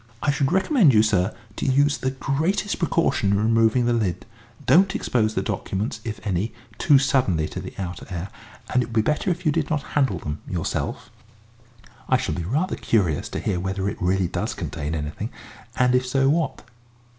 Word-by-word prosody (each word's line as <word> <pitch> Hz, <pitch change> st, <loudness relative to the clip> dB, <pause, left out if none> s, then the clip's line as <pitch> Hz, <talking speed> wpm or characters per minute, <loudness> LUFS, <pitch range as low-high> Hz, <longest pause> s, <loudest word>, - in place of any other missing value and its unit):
I 145 Hz, -, +3 dB
should 140 Hz, 0 st, 0 dB
recommend 190 Hz, -, +4 dB
you, 105 Hz, -, +6 dB
sir, 95 Hz, -4 st, +2 dB, 0.3 s
to -, -, -2 dB
use 145 Hz, +2 st, +3 dB
the 130 Hz, -, 0 dB
greatest 160 Hz, +10 st, -1 dB
precaution 165 Hz, -, +1 dB
in -, -, +3 dB
removing 115 Hz, +3 st, +3 dB
the 120 Hz, -, +2 dB
lid 95 Hz, -7 st, -1 dB, 0.4 s
don't 190 Hz, +3 st, +5 dB
expose 110 Hz, -3 st, 0 dB
the 95 Hz, -, 0 dB
documents, 100 Hz, +3 st, -3 dB
if 110 Hz, -3 st, -5 dB
any, 100 Hz, +3 st, -1 dB, 0.2 s
too 145 Hz, -, +6 dB
suddenly 125 Hz, -, +2 dB
to -, -, -6 dB
the -, -, -9 dB
outer 90 Hz, -2 st, -5 dB
air, 90 Hz, +1 st, -4 dB, 0.4 s
and 125 Hz, -, +4 dB
it 120 Hz, -, -2 dB
would 120 Hz, -, -10 dB
be 110 Hz, -, +5 dB
better 150 Hz, -, 0 dB
if 175 Hz, 0 st, -2 dB
you 155 Hz, -, +4 dB
did 155 Hz, -1 st, -1 dB
not 150 Hz, -2 st, 0 dB
handle 130 Hz, -10 st, +2 dB
them 75 Hz, -1 st, -5 dB
yourself. 85 Hz, -3 st, -3 dB, 1.0 s
I 130 Hz, -, +5 dB
shall 125 Hz, -, -2 dB
be 85 Hz, -, -3 dB
rather 155 Hz, -, 0 dB
curious 90 Hz, -10 st, +1 dB
to -, -, -4 dB
hear 90 Hz, -, -1 dB
whether 95 Hz, +1 st, -2 dB
it -, -, -4 dB
really 90 Hz, 0 st, +2 dB
does -, -, -3 dB
contain 75 Hz, +2 st, -4 dB
anything, 75 Hz, -1 st, -4 dB, 0.5 s
and 125 Hz, -1 st, +3 dB
if 125 Hz, 0 st, +2 dB
so, 135 Hz, +1 st, +2 dB
what." 155 Hz, -1 st, 0 dB
115 Hz, 190 wpm, -23 LUFS, 95-145 Hz, 1.0 s, you